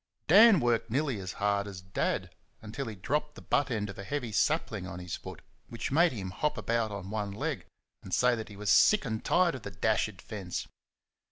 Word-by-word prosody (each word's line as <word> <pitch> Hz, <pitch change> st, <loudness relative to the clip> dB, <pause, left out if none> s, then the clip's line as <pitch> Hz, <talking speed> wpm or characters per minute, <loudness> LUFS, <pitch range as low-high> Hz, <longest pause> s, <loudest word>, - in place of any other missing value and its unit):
Dan 205 Hz, +3 st, +8 dB
worked 120 Hz, -2 st, +1 dB
nearly 135 Hz, -2 st, 0 dB
as 95 Hz, -1 st, -5 dB
hard 100 Hz, 0 st, 0 dB
as 95 Hz, -2 st, -7 dB
Dad 95 Hz, 0 st, -2 dB, 0.3 s
until 115 Hz, +5 st, -6 dB
he 110 Hz, -, -5 dB
dropped 150 Hz, +10 st, -2 dB
the -, -, -11 dB
butt 145 Hz, -, +1 dB
end 110 Hz, -4 st, -1 dB
of 100 Hz, -, -9 dB
a -, -, -5 dB
heavy 125 Hz, 0 st, -3 dB
sapling 105 Hz, -, 0 dB
on 90 Hz, -, -7 dB
his 90 Hz, -2 st, -5 dB
foot, -, -, -10 dB, 0.2 s
which 115 Hz, -, -5 dB
made 165 Hz, +4 st, +4 dB
him 95 Hz, -6 st, -5 dB
hop 150 Hz, +10 st, -1 dB
about 115 Hz, -1 st, 0 dB
on 100 Hz, -1 st, -6 dB
one 105 Hz, -2 st, -2 dB
leg 100 Hz, -, -4 dB, 0.3 s
and 95 Hz, -, -11 dB
say 125 Hz, +5 st, +4 dB
that 110 Hz, -1 st, -4 dB
he 105 Hz, -, -10 dB
was 105 Hz, 0 st, 0 dB
sick 210 Hz, -7 st, +5 dB
and 110 Hz, -3 st, -3 dB
tired 175 Hz, -1 st, +3 dB
of 130 Hz, -, -6 dB
the 100 Hz, -, -6 dB
dashed 105 Hz, +1 st, 0 dB
fence. 95 Hz, -5 st, -5 dB
110 Hz, 210 wpm, -30 LUFS, 100-135 Hz, 0.3 s, Dan